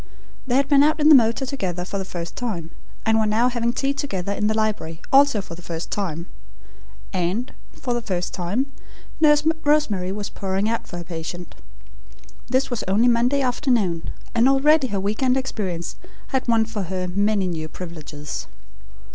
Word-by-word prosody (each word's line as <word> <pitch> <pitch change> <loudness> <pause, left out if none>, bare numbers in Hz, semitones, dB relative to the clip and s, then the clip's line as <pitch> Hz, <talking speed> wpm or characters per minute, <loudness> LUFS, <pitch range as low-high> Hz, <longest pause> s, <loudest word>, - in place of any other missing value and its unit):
They 245 - +1
had 275 +1 +3
been 280 -1 +6
out 305 +2 +3
in 300 +1 +5
the - - +10
motor 235 0 +5
together 185 -10 -3
for 200 +1 -3
the 190 - -4
first 170 -2 -6
time, 175 -9 -4 0.3
and 220 0 +4
were 215 - +2
now 225 +4 +3
having 235 -1 0
tea 275 +3 0
together 200 -10 -3
in 210 +1 0
the 215 - +1
library, 210 -7 -1
also 275 -6 +5
for 170 - -9
the 170 - -10
first 170 -1 -6
time; 170 -5 -2 0.9
and, 185 +7 -1 0.2
for 245 - -3
the 240 - -1
first 180 -5 -3
time, 195 +9 -1 0.5
Nurse 300 -1 +5 0.2
Rosemary 235 -12 +2
was 205 +1 -4
pouring 195 +1 -2
out 230 +1 -1
for 175 - -7
her 175 - -5
patient. 170 +1 -6 0.9
This 260 +2 +1
was 240 - -1
only 210 +6 +3
Monday 245 +4 +3
afternoon, 240 - +1 0.2
and 240 +2 +4
already 275 +1 +4
her 200 -4 -2
week 205 +4 -2
end 260 0 +3
experience 195 -10 -3 0.3
had 265 -2 -1
won 225 -1 +4
for 220 -2 -4
her 185 -1 -2
many 200 +1 +1
new 160 -3 -3
privileges. 155 -4 -7
215 Hz, 180 wpm, -23 LUFS, 180-255 Hz, 0.9 s, the